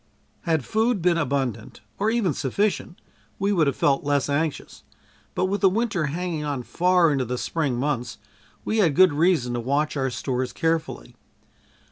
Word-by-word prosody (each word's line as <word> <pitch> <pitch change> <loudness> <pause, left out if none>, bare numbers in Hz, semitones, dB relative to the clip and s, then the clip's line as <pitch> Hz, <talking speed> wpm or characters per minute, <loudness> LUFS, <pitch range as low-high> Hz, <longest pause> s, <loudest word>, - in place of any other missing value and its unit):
Had 160 -5 0
food 220 0 +1
been 170 -1 +2
abundant, 130 -8 -2 0.2
or 210 +2 +2
even 220 -8 +1
sufficient, 175 +7 -2 0.4
we 200 +1 0
would 165 -7 +2
have 140 - 0
felt 135 -1 +1
less 145 -1 0
anxious, 150 +1 -2 0.5
but 185 - +1
with 200 +2 -2
the 195 - +6
winter 205 -5 -1
hanging 165 +1 -3
on 140 -4 -3
far 180 +2 +3
into 135 -2 0
the 125 +1 -3
spring 150 -2 -1
months, 125 -3 -2 0.5
we 220 - 0
had 165 -9 +3
good 185 -3 +6
reason 155 -6 +2
to 120 - -2
watch 140 +6 -1
our 135 -2 0
stores 125 +2 -3
carefully. 165 -1 -2
155 Hz, 165 wpm, -24 LUFS, 135-185 Hz, 0.5 s, the